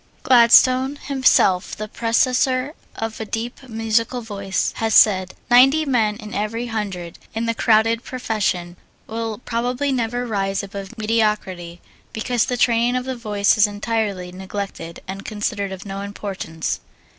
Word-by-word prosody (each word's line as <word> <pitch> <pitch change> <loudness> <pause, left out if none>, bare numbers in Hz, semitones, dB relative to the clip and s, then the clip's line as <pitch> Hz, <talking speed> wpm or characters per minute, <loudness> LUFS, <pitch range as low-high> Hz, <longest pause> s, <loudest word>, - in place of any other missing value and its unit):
Gladstone, 255 +2 +6
himself 260 -10 +2
the 215 - -5
possessor 255 +4 +1 0.2
of 225 0 -4
a - - -2
deep, 240 +4 -5
musical 225 +2 0
voice, 200 -3 -2
has 225 -1 0
said: 190 -3 +5 0.2
"Ninety 270 +6 +6
men 225 -6 +1
in 215 -1 -9
every 225 +2 -2
hundred 185 -6 -4 0.2
in 225 +1 -1
the 230 - 0
crowded 225 +1 +2
professions 190 -8 -2 0.3
will 225 -1 -4
probably 245 +4 -1
never 245 -1 -1
rise 195 -4 -1
above 200 +3 -8
mediocrity 210 -6 -1 0.3
because 230 +1 0
the 250 - -2
training 240 0 +2
of 255 0 -1
the 260 0 -3
voice 210 -3 +1
is 210 - +6
entirely 205 -3 -2
neglected 190 -2 -6
and 195 +1 -6
considered 205 -2 -3
of 190 0 -8
no 195 0 -5
importance." 195 -5 -4
220 Hz, 140 wpm, -21 LUFS, 200-240 Hz, 0.3 s, Gladstone